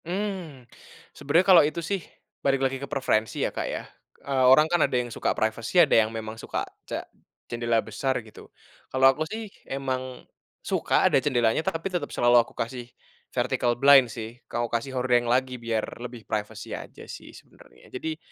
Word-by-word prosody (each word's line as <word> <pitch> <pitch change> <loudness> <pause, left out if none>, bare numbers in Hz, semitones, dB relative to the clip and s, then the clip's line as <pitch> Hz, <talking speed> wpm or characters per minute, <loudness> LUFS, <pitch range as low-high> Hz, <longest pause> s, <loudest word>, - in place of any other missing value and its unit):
Mmm. 180 -7 -4 0.5
Sebenernya 165 +6 +2
kalau 190 -1 +8
itu 150 +3 -1
sih 195 +1 -2 0.4
balik 135 -1 +1
lagi 135 0 -2
ke 140 - -6
preferensi 110 -6 0
ya, - - -3
Kak, - - -3
ya. - - -4 0.4
Eee, 135 -2 +2
orang 150 +4 +7
kan 175 +1 +1
ada 140 -3 +2
yang 120 -2 -2
suka - - 0
privacy, 110 +8 -1
ada - - +6
yang 110 -1 +5
memang 110 0 -6
suka - - -3 0.2
ce - - -2 0.5
jendela 120 -1 -1
besar 130 +5 -1
gitu. 110 - -14 0.4
Kalau 130 0 +2
aku 155 - -2
sih 220 -1 -6 0.2
emang 130 -2 -4 0.4
suka - - +1
ada - - +3
jendelanya, 120 -2 +2
tapi 165 +3 -2
tetep 175 - -2
selalu 120 0 +4
aku - - -11
kasih 120 +1 -4 0.4
vertical 120 -1 0
blind 135 -3 +7
sih, 115 +2 -8
kalau 120 0 -1
kasih 115 +4 -1
hordeng 125 -1 +2
lagi 130 +1 +1
biar 115 -2 -1 0.2
lebih 120 -2 -8
privacy 105 -1 -4
aja - - -10
sih - - -10
sebenernya. - - -18
Jadi 155 +4 -4
130 Hz, 175 wpm, -26 LUFS, 120-145 Hz, 0.5 s, kalau